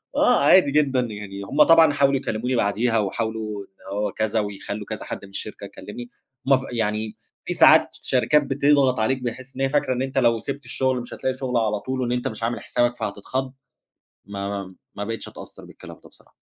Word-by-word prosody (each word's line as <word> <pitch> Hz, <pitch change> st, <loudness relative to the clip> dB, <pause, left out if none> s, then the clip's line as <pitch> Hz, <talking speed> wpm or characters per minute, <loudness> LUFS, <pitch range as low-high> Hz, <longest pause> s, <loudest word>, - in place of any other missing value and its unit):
آه، -, -, +4 dB
عادي 180 Hz, -7 st, +6 dB
جدًا، 140 Hz, -3 st, +2 dB
يعني 105 Hz, -4 st, -6 dB
هُم 145 Hz, +9 st, +4 dB
طبعًا 165 Hz, -2 st, +6 dB
حاولوا 140 Hz, -1 st, +3 dB
يكلِّموني 125 Hz, +1 st, -2 dB
بعديها، 115 Hz, +2 st, +1 dB
وحاولوا 110 Hz, 0 st, -3 dB
إن 95 Hz, +1 st, -9 dB
هو 105 Hz, -, -1 dB
كذا، 110 Hz, 0 st, 0 dB
ويخلّوا 100 Hz, 0 st, -5 dB
كذا -, -, -6 dB
حد -, -, -6 dB
من 100 Hz, -, -15 dB
الشركة 100 Hz, -, -7 dB
يكلِّمني، 120 Hz, +3 st, -9 dB, 0.4 s
ما 135 Hz, -1 st, +5 dB
ف -, -, -6 dB
يعني 110 Hz, -2 st, -2 dB, 0.3 s
في -, -, -2 dB
ساعات -, -, +6 dB
شركات 145 Hz, +3 st, +3 dB
بتضغط 140 Hz, -2 st, +2 dB
عليك، 125 Hz, +4 st, 0 dB
بحيث 125 Hz, +2 st, -6 dB
إن 135 Hz, -, -5 dB
هي 135 Hz, -, +2 dB
فاكرة 145 Hz, -2 st, +1 dB
إن 125 Hz, -, -2 dB
أنت 135 Hz, 0 st, -4 dB
لو 115 Hz, -3 st, +3 dB
سِبت 140 Hz, +2 st, -6 dB
الشُغل 130 Hz, 0 st, 0 dB
مش 120 Hz, -, -9 dB
هتلاقي 130 Hz, 0 st, -2 dB
شُغل 125 Hz, -2 st, -1 dB
على 105 Hz, -2 st, +1 dB
طول، 130 Hz, +2 st, -3 dB
وإن 120 Hz, -, -1 dB
أنت 125 Hz, 0 st, -1 dB
مش 110 Hz, +1 st, -6 dB
عامل 120 Hz, +1 st, -1 dB
حسابَك 120 Hz, 0 st, 0 dB
فهتتخض، 130 Hz, +6 st, -4 dB, 0.7 s
ما 100 Hz, 0 st, -5 dB
ما 100 Hz, -2 st, -6 dB, 0.2 s
ما 100 Hz, -, -4 dB
بقتش 115 Hz, +2 st, -5 dB
أتأثّر -, -, -11 dB
بالكلام -, -, -12 dB
ده -, -, -15 dB
بصراحة. -, -, -20 dB
120 Hz, 200 wpm, -23 LUFS, 105-130 Hz, 0.7 s, عادي